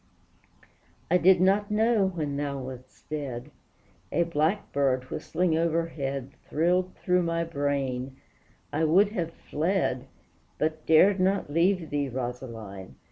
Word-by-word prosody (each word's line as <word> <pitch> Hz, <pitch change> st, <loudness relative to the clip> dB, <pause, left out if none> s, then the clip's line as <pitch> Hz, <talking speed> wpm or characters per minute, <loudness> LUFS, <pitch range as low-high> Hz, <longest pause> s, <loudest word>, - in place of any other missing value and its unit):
I 180 Hz, -, +5 dB
did 185 Hz, +1 st, +6 dB
not 200 Hz, +3 st, +3 dB
know 215 Hz, -1 st, +3 dB
when 155 Hz, -6 st, -3 dB
thou 140 Hz, -1 st, -2 dB
wast 130 Hz, -1 st, -9 dB
dead; 140 Hz, -6 st, -5 dB, 0.6 s
A 170 Hz, -, +2 dB
blackbird 145 Hz, -6 st, 0 dB
whistling 170 Hz, 0 st, 0 dB
overhead 160 Hz, -5 st, -1 dB, 0.2 s
Thrilled 180 Hz, +4 st, +1 dB
through 180 Hz, 0 st, +1 dB
my 170 Hz, -1 st, 0 dB
brain; 140 Hz, -4 st, -2 dB, 0.6 s
I 155 Hz, +2 st, +1 dB
would 185 Hz, +6 st, +5 dB
have 175 Hz, -6 st, -3 dB
fled, 160 Hz, -6 st, -1 dB, 0.5 s
But 155 Hz, 0 st, -2 dB
dared 185 Hz, +5 st, +6 dB
not 190 Hz, -5 st, +1 dB
leave 170 Hz, 0 st, +2 dB
thee, 145 Hz, -1 st, 0 dB
Rosaline! 115 Hz, -6 st, -6 dB
160 Hz, 120 wpm, -27 LUFS, 135-180 Hz, 0.6 s, did